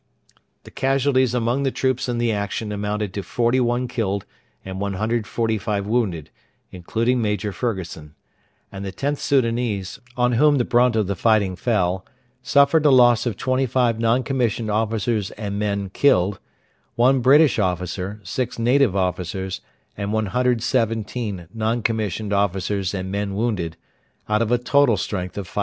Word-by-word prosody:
The - - -13
casualties 135 -2 +1
among 120 +3 0
the 135 - +1
troops 130 -1 -1
in 120 - -1
the 120 -1 +1
action 105 +1 -3
amounted 105 -1 -3
to 100 - -3
41 120 +3 0
killed 100 -5 -2 0.4
and 95 0 -6
145 105 0 -1
wounded, 105 -9 -1 0.4
including 115 +7 -1
Major 105 -1 -1
Fergusson; 90 -9 -5 0.6
and 95 0 -7
the 95 - -4
Xth 140 +9 -2
Soudanese, 115 -7 0 0.2
on 125 0 +2
whom 145 +5 +4
the 120 - +1
brunt 120 0 +3
of 110 -2 +2
the 100 +1 -2
fighting 100 -1 +2
fell, 95 -4 0 0.4
suffered 140 +4 +4
a - - +6
loss 120 -2 +5
of 110 - -3
25 130 -3 +1
non 115 +3 +2
commissioned 120 -5 -1
officers 110 -1 0
and 100 -1 -4
men 100 -2 -2
killed, 100 -6 +2 0.6
1 130 +3 +4
British 140 +2 +5
officer, 90 +1 -2
6 130 +3 -3
native 120 -2 +3
officers, 95 0 -2 0.3
and 100 0 -3
117 110 -3 -1
non 115 +1 -1
commissioned 110 -2 -1
officers 100 0 0
and 95 0 -4
men 100 0 -2
wounded, 100 -7 -2 0.5
out 105 +1 +1
of 115 0 0
a 125 - +4
total 125 -1 +3
strength 90 -2 -4
of 100 - -4
511. 90 - -5
110 Hz, 145 wpm, -22 LUFS, 100-125 Hz, 0.6 s, a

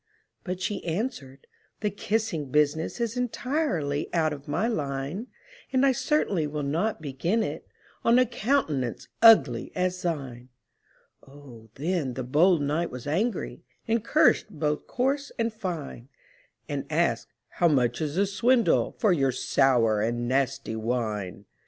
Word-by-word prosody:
But 180 -1 -4
she 200 +2 -3
answered, 160 - -4 0.4
"The 210 -1 0
kissing 200 -7 -2
business 150 - +1
Is 235 -1 -1
entirely 245 - -1
out 160 -2 +2
of 140 -1 -10
my 180 +10 0
line; 145 - -3 0.4
And 260 0 +3
I 275 - +5
certainly 225 - 0
will 150 0 -4
not 165 +6 -1
begin 165 +11 0
it - - -5 0.4
On 235 +1 +5
a 255 - +5
countenance 215 - -1
ugly 145 - +6
as 180 0 -1
thine!" 135 -7 -4 0.7
Oh, 135 -5 -14
then 150 -4 -2
the 130 - -3
bold 155 +5 +3
knight 155 +4 0
was 125 -1 -8
angry, 195 +11 -1 0.3
And 225 -1 +1
cursed 290 -4 +3
both 150 -5 -2
coarse 275 +3 -1
and 230 -1 -1
fine; 165 - -6 0.6
And - - -4
asked, - - +1 0.2
"How 175 - +2
much 125 -5 +1
is 150 -1 -2
the 200 +2 +3
swindle 230 +5 +2
For 210 -5 +3
your 135 -5 +2
sour 115 -4 +2
and 120 +2 -1
nasty 135 -2 -1
wine?" 110 -5 -3
160 Hz, 140 wpm, -27 LUFS, 135-220 Hz, 0.7 s, ugly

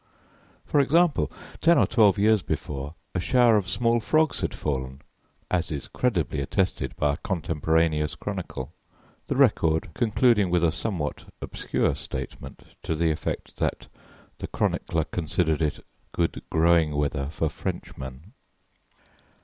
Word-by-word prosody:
For 145 - +2
example, 160 +3 +3 0.3
ten 170 +1 +5
or - - +5
twelve 105 -4 +4
years 105 0 +4
before, 75 -2 -4 0.2
a 95 - 0
shower 120 +4 +4
of 100 -4 +1
small 115 +6 +2
frogs 155 +7 +2
had - - -1
fallen, 65 -1 -4 0.5
as 90 -2 +1
is 70 -3 -4
credibly 85 - 0
attested 70 -4 -1
by 75 -1 +1
a - - -4
contemporaneous 80 -3 0
chronicle, 65 +5 -5 0.5
the - - -1
record 80 0 +3
concluding 110 -2 +3
with 85 -1 +2
a 85 - +4
somewhat 85 -6 -3
obscure - - -1
statement - - -7 0.2
to 80 - -2
the 80 0 +2
effect 75 - -4
that - - -2 0.5
the - - -4
chronicler 80 -1 0
considered 80 -1 -1
it 75 -2 -1 0.3
good 85 -1 -1
growing 80 -2 +3
weather 70 -1 -1
for 80 +1 -1
Frenchmen. 70 +2 -6
85 Hz, 135 wpm, -26 LUFS, 75-105 Hz, 0.5 s, ten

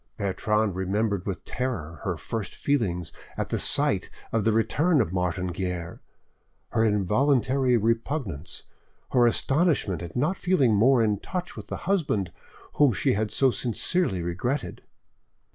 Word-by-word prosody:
Bertrande 105 +1 0
remembered 100 +1 -1
with 95 - -4
terror 85 - -4
her - - -2
first 110 -3 -5
feelings 95 - -1 0.2
at - - -2
the - - -1
sight - - +1 0.2
of 115 -2 +1
the 110 - +3
returned 130 - +2
Martin 90 0 -1
Guerre, 90 -1 -4 0.7
her 110 - +1
involuntary 125 +5 +2
repugnance, 115 - -2 0.5
her 120 -2 +5
astonishment 135 - +1
at 85 - -8
not 155 +10 +1
feeling 150 -11 +3
more 120 +4 +5
in 105 -2 +1
touch 180 - -5
with - - -8
the - - -4
husband 150 - 0 0.5
whom 145 -5 +5
she - - +1
had 105 +2 0
so 135 +3 +3
sincerely 120 - 0
regretted. 120 +12 -2
110 Hz, 135 wpm, -26 LUFS, 95-135 Hz, 0.7 s, her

